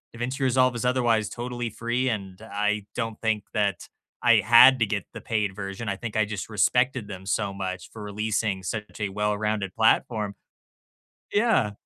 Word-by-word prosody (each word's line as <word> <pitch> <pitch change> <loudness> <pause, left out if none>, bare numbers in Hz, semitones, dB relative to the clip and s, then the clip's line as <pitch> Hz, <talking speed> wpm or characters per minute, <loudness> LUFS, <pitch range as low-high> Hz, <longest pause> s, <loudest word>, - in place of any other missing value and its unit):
DaVinci 125 +4 -3
Resolve 130 -1 +3
is 120 - -3
otherwise 120 -4 +2
totally 120 -1 -4
free, 120 +4 -1
and 100 -3 -5
I 105 -1 -1
don't 115 -2 -3
think 110 -2 0
that 100 -4 -1 0.3
I - - +6
had 125 +3 +8
to 110 - +2
get 100 -2 -2
the - - -8
paid 105 -4 -1
version, 100 +2 -6
I 100 - -2
think 115 -3 -6
I 110 - +3
just 105 0 -5
respected 125 - +1
them 95 -1 -8
so 100 -2 0
much 95 -2 -5
for 110 - -10
releasing 105 -1 -2
such 105 +2 -5
a 100 -2 -1
well-rounded 105 -1 -1
platform. 110 -2 +2 1.0
Yeah. 205 - +2
110 Hz, 165 wpm, -26 LUFS, 100-120 Hz, 1.0 s, had